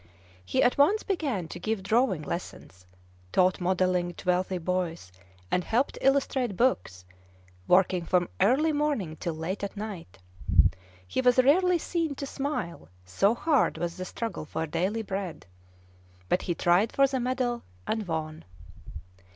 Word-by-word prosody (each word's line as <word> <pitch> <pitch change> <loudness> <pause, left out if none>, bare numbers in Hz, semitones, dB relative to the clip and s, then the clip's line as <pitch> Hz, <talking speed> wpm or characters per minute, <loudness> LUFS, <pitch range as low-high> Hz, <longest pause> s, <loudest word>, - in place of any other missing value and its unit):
He 90 - +1
at 245 - +2
once 395 +10 +4
began 280 - -2
to - - -7
give 220 -3 -2
drawing 215 -6 +2
lessons, 95 - -7 0.4
taught 185 0 +3
modelling 180 -1 +1
to - - -11
wealthy 185 +1 +1
boys, 170 - -3 0.4
and 180 - +1
helped 240 +8 0
illustrate 265 -6 +1
books, 90 - 0 0.6
working 180 -1 +3
from 180 -1 +2
early 265 +11 +3
morning 290 - -1
till 170 -2 -3
late 175 +6 -4
at 200 +1 -5
night. 200 - -7 0.9
He 260 - -1
was 250 -1 +4
rarely 350 +8 +5
seen 330 -3 -2
to 280 - -5
smile, 270 - -4 0.2
so 195 - +2
hard 290 +1 +2
was 170 -1 -3
the 185 0 -5
struggle 225 -4 -5
for 160 +1 -3
daily 185 +8 -1
bread. 190 -4 -5 0.8
But 180 - +2
he 175 - -2
tried 180 +7 +3
for 275 - +4
the 265 -1 -1
medal, 250 -1 -1 0.2
and 220 -3 -2
won. 160 -1 -4
195 Hz, 145 wpm, -28 LUFS, 175-255 Hz, 0.9 s, rarely